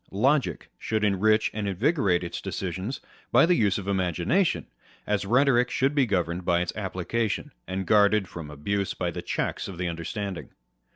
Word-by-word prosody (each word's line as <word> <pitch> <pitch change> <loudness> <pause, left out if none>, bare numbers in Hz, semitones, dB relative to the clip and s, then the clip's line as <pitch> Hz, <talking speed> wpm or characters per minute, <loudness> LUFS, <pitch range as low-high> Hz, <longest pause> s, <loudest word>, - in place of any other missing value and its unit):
Logic 135 +8 +1
should 110 -1 -1
enrich 105 +2 +3
and 105 -1 -3
invigorate 100 - +1
its 85 - -5
decisions 95 +7 -4 0.3
by - - +6
the 180 - +4
use 105 - +2
of 100 -1 -6
imagination; 95 - +1 0.4
as 105 -1 -1
rhetoric 125 +1 +4
should 135 +2 +1
be 140 -4 +3
governed 90 -3 0
in 85 - +4
its 85 0 0
application, 105 +2 -2 0.2
and 95 0 -3
guarded 105 -1 +4
from 85 -4 -8
abuse 95 +7 -2
by 90 -1 -2
the - - -5
checks - - -2
of 95 - -8
the 90 0 -2
understanding. 85 +3 -4
100 Hz, 165 wpm, -26 LUFS, 90-110 Hz, 0.4 s, by